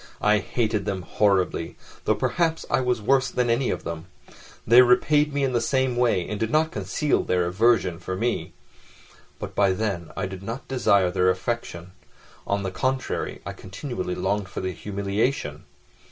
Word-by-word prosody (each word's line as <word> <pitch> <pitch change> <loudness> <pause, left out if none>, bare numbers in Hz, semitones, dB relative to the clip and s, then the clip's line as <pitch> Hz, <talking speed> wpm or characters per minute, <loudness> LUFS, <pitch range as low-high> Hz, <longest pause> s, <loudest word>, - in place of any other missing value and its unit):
I 105 0 +4
hated 110 -2 -1
them 95 -2 -3
horribly, 95 -2 +1 0.3
though - - +3
perhaps 165 -2 0
I - - +3
was 125 -4 0
worse 135 +3 +3
than 125 -1 0
any 120 +2 +1
of - - -2
them. 85 +1 -6 0.6
They 120 +3 +8
repaid 145 +5 +4
me 140 0 -1
in 130 -2 0
the 120 - +2
same 130 0 +1
way, 115 -8 +2
and 105 - -4
did 110 - 0
not 160 +4 +2
conceal 150 -3 0
their 90 -1 +1
aversion 95 -2 +2
for 95 +1 -4
me. 115 +5 -2 0.8
But - - -7
by 100 -2 +3
then 95 -5 -2
I - - -1
did 95 -1 -7
not 115 +6 -6
desire 100 -8 +3
their 90 0 +2
affection: 95 -3 -3 0.6
on 100 0 0
the 95 - -3
contrary, 130 +5 -2
I - - -5
continually 95 -2 -5
longed 95 +2 -1
for - - -5
their 95 0 -2
humiliation. 100 - -2
105 Hz, 170 wpm, -25 LUFS, 95-125 Hz, 0.8 s, They